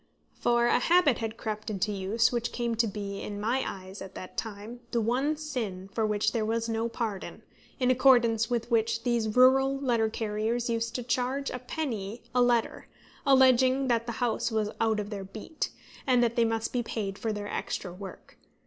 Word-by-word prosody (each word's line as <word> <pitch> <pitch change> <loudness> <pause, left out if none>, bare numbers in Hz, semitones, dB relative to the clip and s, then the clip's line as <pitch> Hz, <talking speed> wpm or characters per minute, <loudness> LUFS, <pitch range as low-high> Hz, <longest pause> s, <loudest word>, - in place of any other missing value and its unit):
For 240 0 +2
a 240 - +4
habit 330 -3 +4
had 225 -1 -4
crept 215 0 -4
into 210 0 -1
use, 205 +4 +1
which 235 -1 -1
came 240 -1 -1
to 230 0 +2
be, 200 -1 -5
in 205 -1 -5
my 235 +5 0
eyes, 190 +1 -7
at 190 0 -9
that 185 - -8
time, 220 +2 -6
the 235 - 0
one 260 +7 +1
sin 225 -11 -4
for 220 -1 +1
which 210 -1 +1
there 230 -2 0
was 225 +1 -1
no 225 0 -1
pardon, 220 -4 -4 0.4
in 255 -1 +3
accordance 240 -4 +4
with 240 0 -2
which 230 0 +1
these 230 -3 0
rural 265 +2 +5
letter 235 -5 +1
carriers 225 +2 -1
used 230 0 -2
to 250 - -2
charge 255 +3 -1
a 250 - -4
penny 235 -6 -4
a 250 - +3
letter, 240 -2 +1 0.4
alleging 260 0 +5
that 230 0 +1
the 235 - -2
house 235 0 0
was 215 -2 -1
out 220 -1 +2
of 205 +1 -5
their 200 -2 -4
beat, 215 - -5 0.4
and 250 -2 +4
that 235 0 +1
they 235 -2 +4
must 225 0 -1
be 245 - +1
paid 205 -4 -4
for 225 - -1
their 205 -1 -4
extra 180 -3 -4
work. 195 +1 -11
230 Hz, 195 wpm, -28 LUFS, 215-245 Hz, 0.4 s, rural